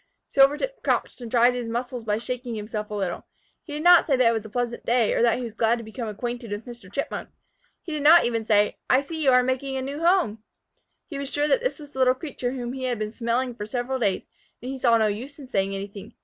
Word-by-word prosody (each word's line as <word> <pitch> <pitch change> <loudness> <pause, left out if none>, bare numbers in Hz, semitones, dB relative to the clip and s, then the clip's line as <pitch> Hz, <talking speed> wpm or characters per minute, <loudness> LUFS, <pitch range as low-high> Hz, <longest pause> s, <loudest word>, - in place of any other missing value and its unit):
Silvertip 290 - +2
crouched - - -1
and 235 - -6
tried 240 +1 +4
his 245 -2 -4
muscles 245 +1 -3
by 210 -1 0
shaking 245 0 -4
himself 210 0 -5
a 210 - -4
little. 190 -4 -3 0.3
He 300 - -10
did 300 +1 -4
not 350 0 +7
say 280 - +3
that 255 -2 +4
it - - 0
was 220 -2 -2
a 220 - -10
pleasant 240 +1 -3
day, 235 -2 +2
or - - +1
that 235 -1 +4
he 250 - -4
was 230 -3 -6
glad 230 +1 +2
to 230 - -7
become 225 +2 -6
acquainted 235 +2 -5
with 205 +2 -5
Mr. 235 -6 -11
Chipmunk. 280 - -4 0.5
He 340 - -7
did 305 -1 -2
not 330 +4 +7
even 230 -2 0
say, 210 -1 +2
"I 260 - +5
see 315 +3 -6
you 275 - +5
are 250 -1 +5
making 265 +1 -1
a - - -2
new 280 +3 -5
home!" 340 - +2 0.6
He 285 -5 -6
was 280 -1 -4
sure 290 0 +1
this - - +1
was 295 -3 -12
the 265 - -8
little 255 0 +4
creature 260 -3 -4
whom 245 -2 -4
he 260 -1 -4
had 245 -2 -1
been 215 0 -3
smelling 240 +2 -1
for 210 -3 -7
several 250 +3 -2
days, 200 -5 0 0.4
and 250 +2 -6
he 270 - -6
saw 235 -2 +4
no 220 - +3
use 235 +7 -3
in 280 -3 -10
saying 195 -5 0
anything. 200 0 -8
245 Hz, 255 wpm, -25 LUFS, 225-270 Hz, 0.6 s, not